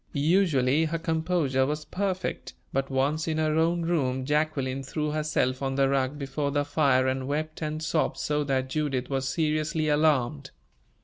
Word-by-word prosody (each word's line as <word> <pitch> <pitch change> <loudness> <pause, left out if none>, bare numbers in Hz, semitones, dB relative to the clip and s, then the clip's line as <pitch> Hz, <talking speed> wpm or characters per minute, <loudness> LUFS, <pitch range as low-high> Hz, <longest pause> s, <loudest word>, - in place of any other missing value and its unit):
Usually 150 -3 +3
her 165 +1 -1
composure 160 -5 0
was 150 +1 -3
perfect, 190 -1 -3 0.2
but 135 0 0
once 140 +4 0
in 160 -1 -1
her 155 -1 +1
own 165 +2 +2
room, 130 -6 0
Jacqueline 145 -3 0
threw 150 +3 -3
herself 150 -4 0
on 135 -1 -1
the 135 0 +3
rug 135 +1 0
before 140 +1 -2
the 145 0 0
fire 140 -3 +2
and 130 0 -1
wept 155 +3 -3
and 155 0 -3
sobbed 155 -1 0
so 150 0 0
that 130 -2 0
Judith 140 -4 -1
was 135 0 -1
seriously 155 +1 0
alarmed. 145 - +1
150 Hz, 165 wpm, -27 LUFS, 135-155 Hz, 0.2 s, Usually